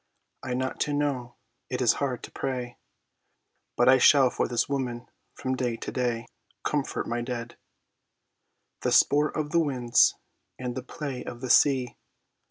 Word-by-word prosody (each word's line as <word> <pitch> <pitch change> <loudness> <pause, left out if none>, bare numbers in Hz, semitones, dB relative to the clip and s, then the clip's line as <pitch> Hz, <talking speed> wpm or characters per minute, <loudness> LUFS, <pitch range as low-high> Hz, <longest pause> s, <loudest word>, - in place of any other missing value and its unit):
I 125 - -3
not 130 +1 -3
to 145 - 0
know. 140 -4 -2 0.3
It 125 - -2
is 125 -3 +4
hard 130 -3 -2
to - - -9
pray, 125 -2 -4 1.0
But 120 - +4
I 130 0 +7
shall 135 -1 +6
for - - -1
this 120 - 0
woman 125 -4 -3 0.3
from 130 0 -2
day 120 -2 -2
to - - -6
day, 120 -2 -1 0.4
"Comfort 145 -2 -1
my 120 +1 -2
dead, 120 -1 -5 1.3
The - - 0
sport 150 +2 +4
of 150 -1 -2
the 170 - +3
winds 125 -6 +3 0.4
and 125 -1 -4
the 130 - -4
play 135 0 -6
of 120 - -8
the 130 - -1
sea." 130 -4 +4
125 Hz, 160 wpm, -27 LUFS, 120-140 Hz, 1.3 s, I